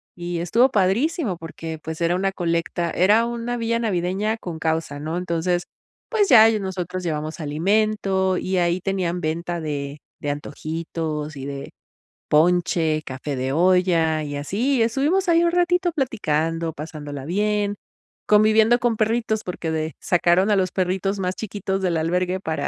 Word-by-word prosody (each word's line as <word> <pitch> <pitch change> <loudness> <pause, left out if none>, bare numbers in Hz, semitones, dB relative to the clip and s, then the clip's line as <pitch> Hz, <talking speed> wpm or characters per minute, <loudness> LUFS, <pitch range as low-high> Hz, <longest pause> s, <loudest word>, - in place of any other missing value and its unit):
y 175 -1 -4
estuvo 230 +10 +3
padrísimo 215 - +1
porque, 165 -1 -7
pues, 160 0 -5
era 170 +1 +2
una 195 +1 0
colecta, 170 -1 -1
era 210 +5 +4
una 235 +1 -3
vía 230 0 0
navideña 205 +1 -1
con 175 -6 -6
causa, 160 -3 -1
¿no? 155 +3 -3
Entonces, 175 0 -1 0.5
pues 420 -4 +2
ya 225 -4 +9
ahí 220 -1 +4
nosotros 185 -1 -4
llevamos 155 -1 -3
alimento 190 +4 +1
y 185 0 -1
ahí 175 0 +2
tenían 185 -3 -1
venta 170 +2 -2
de 145 -1 -4 0.2
de 145 - -2
antojitos 155 +1 -4
y 135 - -6
de 140 -1 -6 0.6
ponche, 160 -1 +2
café 130 +2 -5
de 130 +1 -2
olla, 170 -2 +3
y 145 -1 -4
así 230 - 0
estuvimos 290 +12 +1
ahí 335 0 +5
un 340 - +3
ratito 355 0 +2
platicando, 165 - -1
pasándola 145 -3 -7
bien, 205 +3 0 0.5
conviviendo 215 +3 +5
con 240 -3 +1
perritos 220 0 0
porque 175 -2 -4
de 160 -1 -2
sacaron 175 +3 +3
a - - +4
los 185 -2 +1
perritos 190 +2 -1
más 185 0 -1
chiquitos 195 -2 -3
del 180 -3 0
albergue 180 +3 0
para 155 -5 -2
180 Hz, 155 wpm, -22 LUFS, 160-215 Hz, 0.6 s, ya